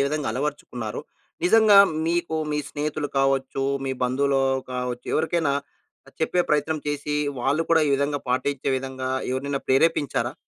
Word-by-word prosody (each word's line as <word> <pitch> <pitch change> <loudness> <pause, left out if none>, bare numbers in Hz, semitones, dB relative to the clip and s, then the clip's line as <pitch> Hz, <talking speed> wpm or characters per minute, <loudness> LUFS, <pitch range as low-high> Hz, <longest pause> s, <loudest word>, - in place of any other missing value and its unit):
విధంగా 150 -3 -2
అలవరచుకున్నారో 125 -4 -4 0.4
నిజంగా 210 +1 +6 0.3
మీకు, 170 -1 0 0.2
మీ 150 - 0
స్నేహితులు 150 0 -3
కావచ్చు, 135 0 +1 0.2
మీ 135 - -1
బంధువులో 135 +2 +1 0.3
కావచ్చు, 125 -1 -4
ఎవరికైనా 160 -2 +1 0.7
చెప్పే 175 +3 +1
ప్రయత్నం 150 +1 +1
చేసి 145 0 -2 0.3
వాళ్ళు 145 +6 +1
కూడా 165 -1 +5
ఈ - - +1
విధంగా 140 +1 0
పాటించే 130 +2 -1
విధంగా 130 0 -4 0.2
ఎవరినైనా 140 +1 -2
ప్రేరేపించారా? 145 +1 +1
140 Hz, 125 wpm, -24 LUFS, 130-155 Hz, 0.7 s, నిజంగా